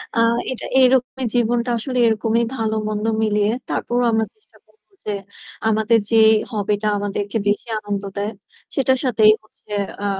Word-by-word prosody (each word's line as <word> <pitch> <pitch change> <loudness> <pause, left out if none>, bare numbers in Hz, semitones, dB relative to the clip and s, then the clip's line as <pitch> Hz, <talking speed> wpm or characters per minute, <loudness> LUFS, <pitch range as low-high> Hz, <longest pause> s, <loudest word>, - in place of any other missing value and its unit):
আ - - -3 0.3
এটা 255 - -5
এরকমই 260 0 +3
জীবনটা 240 +1 +1
আসলে 255 +3 -4
এরকমই 225 +1 +1
ভালো 220 -2 -1
মন্দ 210 0 -2 0.2
মিলিয়ে। 210 -1 +2 0.2
তারপরও 245 +1 -1
আমরা 220 0 +2
চেষ্টা 430 - -27
করবো 435 - -35
যে 210 - -2 0.6
আমাদের 220 +1 +3
যে 230 - +1 0.4
hobby 210 -2 -1
টা 215 - 0
আমাদেরকে 205 +1 -3
বেশি 205 +3 0
আনন্দ 205 -1 -4
দেয়। 205 +2 -2 0.4
সেটার 260 -1 +2
সাথেই 220 -4 +5
হচ্ছে 215 - -22 0.3
আ - - -3
220 Hz, 155 wpm, -20 LUFS, 210-245 Hz, 0.6 s, সাথেই